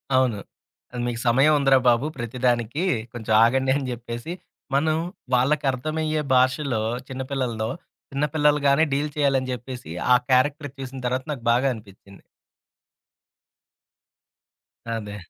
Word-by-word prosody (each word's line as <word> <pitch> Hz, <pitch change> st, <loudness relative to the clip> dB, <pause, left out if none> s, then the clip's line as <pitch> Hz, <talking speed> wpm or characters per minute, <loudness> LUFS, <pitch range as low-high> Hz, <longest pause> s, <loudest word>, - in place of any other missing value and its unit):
అవును. 125 Hz, -6 st, +2 dB, 0.6 s
అ -, -, -4 dB
మీకు 120 Hz, -1 st, -3 dB
సమయం 135 Hz, +6 st, +5 dB
ఉందిరా 135 Hz, -1 st, +5 dB
బాబు! 120 Hz, +4 st, +2 dB
ప్రతిదానికి. 120 Hz, +4 st, -1 dB, 0.3 s
కొంచెం 110 Hz, -2 st, -2 dB
ఆగండి 130 Hz, +3 st, +2 dB
అని 140 Hz, -2 st, -2 dB
జెప్పేసి, 120 Hz, +6 st, -6 dB, 0.4 s
మనం 155 Hz, +2 st, +2 dB, 0.4 s
వాళ్ళకర్థమయ్యే 150 Hz, +4 st, +1 dB
భాషలో 130 Hz, -2 st, +2 dB, 0.3 s
చిన్న 130 Hz, -1 st, -5 dB
పిల్లలదో 120 Hz, -5 st, -2 dB, 0.4 s
చిన్న 140 Hz, +2 st, +1 dB
పిల్లలుగానే 150 Hz, -1 st, +3 dB
డీల్ 145 Hz, +2 st, 0 dB
చేయాలని 135 Hz, -3 st, +1 dB
జెప్పేసి 125 Hz, -5 st, -7 dB, 0.2 s
ఆ -, -, +8 dB
క్యారెక్టర్ 145 Hz, +3 st, +2 dB
చూసిన 135 Hz, 0 st, -7 dB
తర్వాత 130 Hz, +1 st, -1 dB
నాకు 125 Hz, -5 st, -6 dB
బాగా 125 Hz, +3 st, +3 dB
అనిపిచ్చింది. 100 Hz, -2 st, -14 dB, 2.6 s
అదే. 105 Hz, -3 st, -5 dB
130 Hz, 115 wpm, -24 LUFS, 120-140 Hz, 2.6 s, ఆ